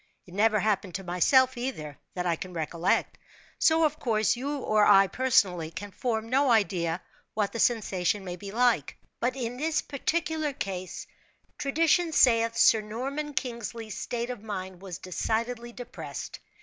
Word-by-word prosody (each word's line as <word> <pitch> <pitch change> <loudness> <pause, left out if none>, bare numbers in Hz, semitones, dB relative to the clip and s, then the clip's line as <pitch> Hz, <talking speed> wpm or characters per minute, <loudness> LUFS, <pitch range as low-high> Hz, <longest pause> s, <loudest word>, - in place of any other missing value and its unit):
It 175 - -15
never 215 +2 +3
happened 195 -3 0
to 195 - -4
myself, 255 +9 +3
either, 240 - -5 0.2
that 180 -1 -2
I 170 -1 +2
can 180 +2 -8
recollect; 165 +2 0 0.4
so, 320 0 +4
of 305 0 -1
course, 220 -6 +2
you 280 +4 -3
or 215 -5 +2
I 195 -1 +7
personally 190 -8 +2
can 205 +5 -7
form 225 0 -2
no 270 +3 +2
idea 185 -6 +1 0.3
what 210 -2 0
the 230 - -4
sensation 205 -4 +1
may 180 -1 -4
be 195 +3 -9
like; 230 - +1 0.2
but 250 +2 0
in 245 -2 -4
this 310 +3 0
particular 315 +1 -1
case, 185 -6 -5 0.5
tradition 320 +3 +2
saith 230 -4 +4
Sir 220 -1 +6
Norman 270 +7 -4
Kingsley's 230 -3 -4
state 240 +1 -3
of 245 -5 -7
mind 190 -4 -6
was 190 -3 -7
decidedly 230 +6 -2
depressed. 245 0 -7
225 Hz, 155 wpm, -28 LUFS, 190-255 Hz, 0.5 s, I